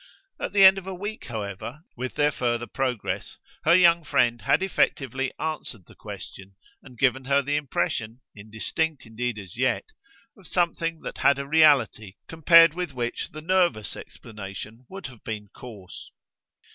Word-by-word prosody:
At - - -3
the 200 -1 +6
end 190 +1 +8
of 190 - -13
a 190 - -4
week, 205 +4 -6
however, 110 +4 -6
with 130 +1 -5
their 150 0 +3
further 120 -3 -1
progress, 125 -4 -3 0.3
her 170 +2 +6
young 170 -2 +5
friend 120 -5 +1
had 185 - +2
effectively 135 -8 0
answered 155 - -5
the - - -17
question 95 0 -10 0.3
and 125 -3 -15
given 135 +1 +1
her 140 +1 +2
the 145 +2 -1
impression, 120 -5 -2
indistinct 110 +9 -3
indeed 115 +1 -3
as 95 -1 -10
yet, 130 0 +1 0.5
of 195 -5 -16
something 165 -2 -1
that - - -7
had 140 - +4
a 140 - -4
reality 140 -9 +3
compared 165 0 +6
with 175 -4 -4
which 120 -2 -3
the 155 - -9
nervous 175 - +1
explanation 105 +2 -10
would 195 -1 -9
have 125 -5 -10
been 105 -2 -6
coarse. 105 -7 -11
135 Hz, 160 wpm, -25 LUFS, 115-160 Hz, 0.5 s, end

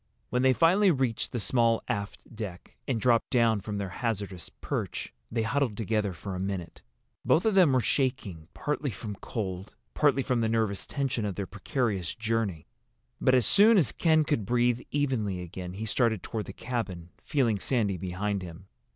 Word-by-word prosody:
When 125 - +1
they 130 0 +5
finally 180 +8 +4
reached 130 -8 0
the 120 - -2
small 115 0 +2
aft 105 -1 -5
deck, 100 -5 -7
and 125 -4 0
dropped 120 -1 +2
down 115 -4 +3
from 105 +1 -4
their 100 -2 -3
hazardous 100 -6 -3
perch, - - -4 0.2
they 115 -1 0
huddled 115 -2 0
together 105 -2 0
for 90 +3 -7
a 90 - -4
minute. 95 -2 -4 0.4
Both 165 - +3
of 220 - +3
them 185 -7 +6
were 130 -1 +3
shaking, 110 - -1
partly 150 -1 -2
from 105 -1 -6
cold, 95 -4 -5 0.2
partly 140 -2 +3
from 125 -2 0
the 110 - +1
nervous 110 -4 0
tension 135 -5 -1
of 100 -3 -2
their 100 - -3
precarious 100 - -2
journey. 110 -8 -1 0.6
But 130 - +4
as 125 - +4
soon 215 +2 +6
as 160 -9 +3
Ken 160 -2 +3
could 145 -7 0
breathe 120 +3 +2
evenly 125 -10 0
again 90 +1 -7
he 105 +4 -5
started 110 -3 +1
toward 110 -2 -4
the - - -7
cabin, 95 -10 -4
feeling 120 -9 +1
Sandy 105 -5 0
behind 95 +3 -2
him. 90 +1 -9
115 Hz, 175 wpm, -28 LUFS, 100-130 Hz, 0.6 s, them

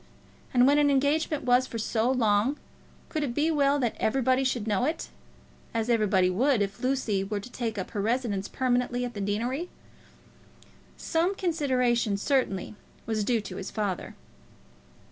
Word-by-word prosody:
And 245 -1 +5
when 285 +2 +5
an 290 -1 +4
engagement 285 +2 +1
was 250 +1 +3
for 230 - -6
so 225 +1 0
long, 235 +1 +2 0.5
could 310 - -3
it 255 -5 -2
be 310 +2 +2
well 285 -2 +3
that 245 -5 -1
everybody 260 +3 +2
should 255 -5 -1
know 210 0 0
it, 315 +5 -2 0.7
as 225 +1 0
everybody 200 -5 +3
would 230 +5 +2
if 195 0 -5
Lucy 255 -7 0
were 205 +1 -3
to 245 +5 -10
take 230 -4 -3
up 190 - -4
her 205 - -2
residence 220 -3 -1
permanently 250 -1 0
at 245 - -6
the 205 - -5
deanery? 240 - -2 1.3
Some 340 +4 0
consideration, 255 - +1
certainly, 215 -5 0 0.3
was 215 -1 -1
due 230 +1 +1
to 205 - -8
his 195 - -5
father. 200 -4 -3
245 Hz, 160 wpm, -27 LUFS, 210-275 Hz, 1.3 s, And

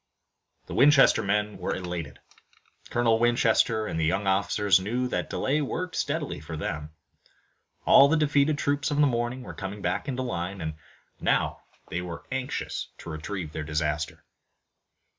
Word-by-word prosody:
The - - -8
Winchester 140 -4 +6
men 105 0 -1
were 90 - -2
elated. 90 -5 -5 0.7
Colonel 115 -2 +2
Winchester 115 -2 +3
and 80 - -3
the - - +1
young 95 +5 0
officers 100 0 +3
knew 120 +7 -1
that - - -2
delay 145 +3 0
worked 180 +5 -3
steadily - - -2
for 80 +1 -7
them. 75 -1 -4 1.0
All 140 - +8
the 160 +3 +2
defeated 145 0 +2
troops 145 +1 0
of 145 - -1
the 150 - +5
morning 120 0 -1
were - - -8
coming 100 +1 -6
back - - -1
into 130 -2 -2
line, 95 -5 -3
and 80 -2 -3 0.5
now - - +1 0.3
they 90 - -2
were 85 -1 -7
anxious 130 0 -3
to 85 - -8
retrieve 80 +1 -5
their 80 - -4
disaster. 75 +1 -2
105 Hz, 155 wpm, -27 LUFS, 85-130 Hz, 1.0 s, All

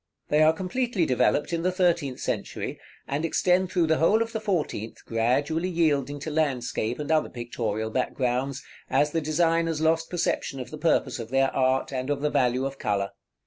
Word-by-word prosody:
They 150 +1 +3
are 155 0 +7
completely 190 +3 -1
developed 130 +4 +1
in 165 - 0
the 185 +2 +1
thirteenth 170 -8 +1
century, - - -3 0.3
and 140 +3 -2
extend 180 +2 +2
through 175 -3 +2
the 160 0 +2
whole 215 +7 +4
of 230 - -9
the 220 - -1
fourteenth 170 - -3
gradually 140 +10 0
yielding 145 -5 +1
to 155 - -4
landscape, 125 -6 -1
and 150 +1 -3
other 155 -1 +2
pictorial 110 -3 -3
backgrounds, 130 +2 -1 0.3
as 150 0 +2
the 165 - 0
designers 165 +1 +1
lost 160 +1 +1
perception 160 -5 -1
of 125 - -7
the 155 - -7
purpose 160 -5 +1
of 115 -1 -6
their 135 +1 +2
art, 130 0 +1
and 130 +1 -3
of 145 -1 -1
the 150 0 0
value 125 +1 +2
of 135 0 -5
color. 100 -1 -1
150 Hz, 185 wpm, -26 LUFS, 130-165 Hz, 0.3 s, are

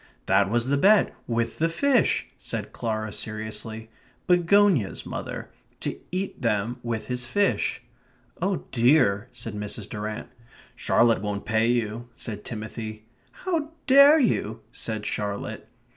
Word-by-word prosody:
"That 95 +1 +3
was 120 +2 +1
the 140 +1 +2
bet; 200 +7 +5
with 115 -1 -1
the 165 +1 +2
fish," 250 +9 +2
said - - -5
Clara 110 -2 -3
seriously. 110 +1 -4 0.3
"Begonias, 180 - +3
mother. - - -6 0.3
To - - -2 0.2
eat 185 +2 -3
them 115 +1 0
with 115 -2 -3
his 125 -1 -3
fish." 200 +9 +1 0.6
"Oh 190 0 -1
dear," 120 -4 +3
said 115 -3 -7
Mrs. 105 0 -5
Durrant. 105 +2 -5 0.5
"Charlotte 115 -4 +3
won't 105 -1 -3
pay 110 0 +2
you," 120 0 -1
said 105 -2 -7
Timothy. 110 -1 -6 0.3
"How 325 -4 -3
dare 280 +3 +8
you 115 - 0
..." - - -36
said 110 -2 -4
Charlotte. 105 -1 -4
115 Hz, 130 wpm, -26 LUFS, 110-165 Hz, 0.6 s, dare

